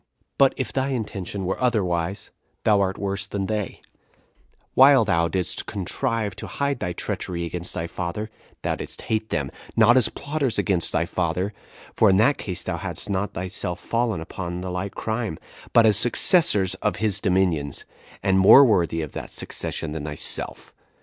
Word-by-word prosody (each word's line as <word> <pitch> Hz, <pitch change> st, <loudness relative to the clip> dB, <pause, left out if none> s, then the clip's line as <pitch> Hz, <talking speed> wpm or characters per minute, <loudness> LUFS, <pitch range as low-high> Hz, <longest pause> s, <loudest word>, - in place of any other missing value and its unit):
But 135 Hz, -1 st, +5 dB
if 120 Hz, -6 st, -3 dB
thy 135 Hz, 0 st, 0 dB
intention 100 Hz, -6 st, -4 dB
were 95 Hz, -, -3 dB
otherwise, 95 Hz, -6 st, -1 dB, 0.3 s
thou 105 Hz, -2 st, +4 dB
art 95 Hz, 0 st, -1 dB
worse 100 Hz, 0 st, -3 dB
than 100 Hz, -1 st, -3 dB
they: 105 Hz, -2 st, -3 dB, 0.9 s
while 135 Hz, -3 st, +6 dB
thou 85 Hz, -4 st, +2 dB
didst 90 Hz, +1 st, 0 dB
contrive 110 Hz, +2 st, -2 dB
to -, -, -7 dB
hide 140 Hz, -2 st, -2 dB
thy 90 Hz, -, -2 dB
treachery 85 Hz, 0 st, -4 dB
against 85 Hz, +1 st, -4 dB
thy 85 Hz, -2 st, -2 dB
father, 95 Hz, +5 st, -5 dB, 0.3 s
thou -, -, 0 dB
didst -, -, -6 dB
hate 110 Hz, 0 st, -2 dB
them, 70 Hz, -3 st, -2 dB, 0.2 s
not 115 Hz, +2 st, +6 dB
as 125 Hz, -, +3 dB
plotters 145 Hz, -5 st, -2 dB
against 90 Hz, -4 st, +1 dB
thy 85 Hz, +1 st, +1 dB
father, 90 Hz, +3 st, -2 dB, 0.4 s
for 110 Hz, -, +4 dB
in 95 Hz, -, +4 dB
that 135 Hz, +8 st, +3 dB
case 90 Hz, -4 st, -4 dB
thou -, -, -3 dB
hadst -, -, -5 dB
not 100 Hz, +1 st, -2 dB
thyself 90 Hz, -1 st, -4 dB
fallen 115 Hz, -7 st, -1 dB
upon 85 Hz, +1 st, -6 dB
the 90 Hz, 0 st, -5 dB
like 95 Hz, +2 st, -4 dB
crime, 110 Hz, -6 st, -3 dB, 0.3 s
but 115 Hz, -, +5 dB
as 105 Hz, -3 st, +6 dB
successors 110 Hz, -, +4 dB
of 105 Hz, -, 0 dB
his 105 Hz, -2 st, 0 dB
dominions, 90 Hz, -7 st, 0 dB, 0.4 s
and 95 Hz, -1 st, +3 dB
more 120 Hz, +9 st, +9 dB
worthy 85 Hz, -8 st, +1 dB
of 75 Hz, -, -7 dB
that -, -, -7 dB
succession 80 Hz, -, -2 dB
than 75 Hz, -1 st, -5 dB
thyself. 75 Hz, -1 st, -1 dB
100 Hz, 170 wpm, -23 LUFS, 90-110 Hz, 0.9 s, more